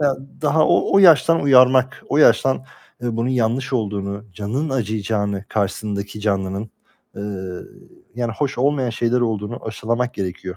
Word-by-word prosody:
Ya, 140 Hz, -2 st, +2 dB, 0.3 s
daha 155 Hz, +1 st, +3 dB
o, -, -, +2 dB
o 195 Hz, -, +7 dB
yaştan 165 Hz, -3 st, +6 dB
uyarmak, 130 Hz, -1 st, +4 dB
o -, -, 0 dB
yaştan, 130 Hz, -1 st, +4 dB, 0.4 s
ııı, 120 Hz, -2 st, -2 dB
bunun 115 Hz, +2 st, -1 dB
yanlış 125 Hz, +1 st, 0 dB
olduğunu, 100 Hz, -3 st, -3 dB
canının 115 Hz, -, -3 dB
acıyacağını, 105 Hz, -4 st, -2 dB
karşısındaki 100 Hz, 0 st, -3 dB
canlının, 100 Hz, 0 st, -2 dB, 0.5 s
eee, 100 Hz, -, -6 dB, 0.9 s
yani 120 Hz, -1 st, -2 dB
hoş 135 Hz, +2 st, -3 dB
olmayan 135 Hz, -2 st, +1 dB
şeyler 120 Hz, +2 st, 0 dB
olduğunu 110 Hz, 0 st, -3 dB
aşılamak 115 Hz, +3 st, -2 dB
gerekiyor. 95 Hz, -1 st, -5 dB
115 Hz, 135 wpm, -20 LUFS, 105-130 Hz, 0.9 s, o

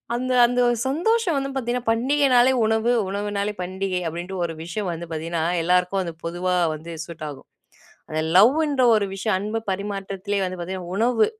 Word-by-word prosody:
அந்த 255 Hz, +1 st, -2 dB
அந்த 245 Hz, +1 st, +1 dB, 0.3 s
சந்தோஷம் 355 Hz, +4 st, +1 dB
வந்து 275 Hz, 0 st, -2 dB
பார்த்தீங்கன்னா, 245 Hz, -2 st, -2 dB
"பண்டிகைனாலே 255 Hz, +1 st, +4 dB
உணவு 220 Hz, +2 st, +2 dB, 0.2 s
உணவுனாலே 205 Hz, +1 st, -2 dB
பண்டிகை" 185 Hz, 0 st, -2 dB
அப்பிடின்ட்டு 175 Hz, +3 st, -5 dB
ஒரு 165 Hz, -, -4 dB
விஷயம் 180 Hz, +3 st, -3 dB
வந்து 170 Hz, +1 st, -5 dB
பார்த்தீங்கன்னா, 160 Hz, +1 st, -2 dB, 0.2 s
எல்லாருக்கும் 180 Hz, +2 st, +2 dB
அது 170 Hz, -, -4 dB
பொதுவா 180 Hz, +2 st, -1 dB, 0.2 s
வந்து 165 Hz, +2 st, -8 dB
சூட் 170 Hz, -2 st, -9 dB
ஆகும். 140 Hz, -2 st, -11 dB, 0.6 s
அந்த 155 Hz, 0 st, -1 dB, 0.2 s
லவ்ன்ற 275 Hz, +5 st, +4 dB
ஒரு 205 Hz, -2 st, +2 dB
விஷயம் 195 Hz, 0 st, 0 dB
அன்பு 215 Hz, +3 st, -3 dB
பரிமாற்றத்திலேயே 195 Hz, 0 st, -3 dB
வந்து 185 Hz, 0 st, -5 dB
பார்த்தீங்கன்னா, 180 Hz, 0 st, -5 dB
உணவு 230 Hz, 0 st, +3 dB
200 Hz, 155 wpm, -23 LUFS, 180-240 Hz, 0.6 s, பண்டிகைனாலே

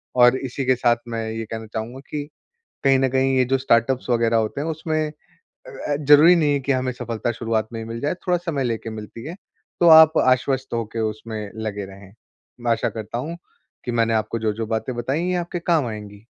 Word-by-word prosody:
और 125 Hz, +1 st, +6 dB
इसी 130 Hz, +1 st, -4 dB
के 130 Hz, 0 st, +4 dB
साथ 120 Hz, -1 st, +2 dB
मैं 115 Hz, -1 st, -3 dB
ये 115 Hz, 0 st, -4 dB
कहना 110 Hz, 0 st, -6 dB
चाहूँगा 115 Hz, +4 st, -5 dB
कि 145 Hz, -1 st, -4 dB, 0.6 s
कहीं 135 Hz, -1 st, +5 dB
न 135 Hz, -, +2 dB
कहीं 135 Hz, +1 st, +2 dB
ये 130 Hz, -, +4 dB
जो 135 Hz, +2 st, +1 dB
स्टार्टअप्स 130 Hz, 0 st, +1 dB
वगैरह 115 Hz, -1 st, +2 dB
होते 110 Hz, +4 st, -1 dB
हैं 160 Hz, -, -3 dB
उसमें 155 Hz, 0 st, -1 dB, 0.4 s
अ, 470 Hz, -, -6 dB
ज़रूरी 150 Hz, +4 st, +7 dB
नहीं 150 Hz, -3 st, +2 dB
है 140 Hz, -, 0 dB
कि 140 Hz, +1 st, 0 dB
हमें 130 Hz, -1 st, -1 dB
सफलता 120 Hz, -1 st, -3 dB
शुरुआत 110 Hz, -1 st, -2 dB
में 115 Hz, -, -4 dB
ही 110 Hz, -, -7 dB
मिल 115 Hz, +1 st, -6 dB
जाए, 145 Hz, +6 st, -1 dB
थोड़ा 180 Hz, -1 st, +3 dB
समय 165 Hz, -6 st, -2 dB
लेके 115 Hz, -2 st, -3 dB
मिलती 110 Hz, +1 st, -8 dB
है, 165 Hz, -, -6 dB, 0.5 s
तो 175 Hz, -, +6 dB
आप 160 Hz, 0 st, +8 dB
आश्वस्त 130 Hz, 0 st, +1 dB
होके 115 Hz, -1 st, -3 dB
उसमें 110 Hz, -1 st, -7 dB
लगे 105 Hz, -2 st, -3 dB
रहें। 95 Hz, 0 st, -14 dB, 0.5 s
मैं 120 Hz, 0 st, -1 dB
आशा 115 Hz, -, 0 dB
करता 110 Hz, +1 st, -5 dB
हूँ, 160 Hz, +7 st, -5 dB, 0.5 s
कि -, -, -2 dB
मैंने 115 Hz, -1 st, +2 dB
आपको 110 Hz, +1 st, -1 dB
जो-जो 110 Hz, 0 st, -2 dB
बातें 110 Hz, +3 st, -2 dB
बताई 130 Hz, +6 st, -1 dB
है, 175 Hz, -, -1 dB
ये -, -, 0 dB
आपके 175 Hz, 0 st, -3 dB
काम 165 Hz, -5 st, +1 dB
आएँगी। 105 Hz, -1 st, -9 dB
120 Hz, 215 wpm, -22 LUFS, 115-145 Hz, 0.6 s, आप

